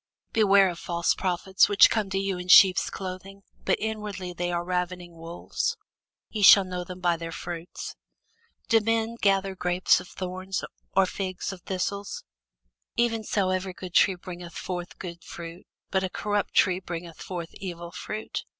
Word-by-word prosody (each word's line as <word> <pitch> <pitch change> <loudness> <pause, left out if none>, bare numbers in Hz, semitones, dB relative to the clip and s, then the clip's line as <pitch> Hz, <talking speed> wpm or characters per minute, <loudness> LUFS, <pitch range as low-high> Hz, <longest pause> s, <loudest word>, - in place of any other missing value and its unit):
Beware 200 -3 +5
of 175 -1 -6
false 170 -1 +1
prophets, 190 +1 +2
which 205 - +7
come 215 -3 0
to 195 - -1
you 195 -2 -1
in 180 - -7
sheep's 185 0 +7
clothing, 195 +1 -7 0.2
but - - +2
inwardly 210 -4 -4
they 175 0 -2
are 175 0 -1
ravening 180 -1 -3
wolves. 170 - -3 0.5
Ye 215 - -3
shall 200 0 +9
know 180 -1 -4
them 180 +1 -9
by 175 -1 +2
their 165 0 -6
fruits. 170 0 -6 0.7
Do 225 - +5
men 225 +1 0
gather 195 -1 +2
grapes 180 0 +3
of 180 - -10
thorns, 185 +1 -4 0.3
or 195 - +6
figs 185 0 -4
of 185 - -11
thistles? 200 +2 -3 0.7
Even 230 -2 +1
so 195 -3 0
every 185 0 -2
good 180 -2 -8
tree 190 - +5
bringeth 175 -1 -9
forth 180 -1 -5
good 170 -2 -8
fruit; 170 +1 -9 0.2
but 190 -1 +1
a 190 - -1
corrupt 205 +2 -2
tree 185 -2 +4
bringeth 170 -3 -7
forth 175 -3 -6
evil 175 -3 -7
fruit. 215 +4 -5
185 Hz, 165 wpm, -27 LUFS, 175-195 Hz, 0.7 s, shall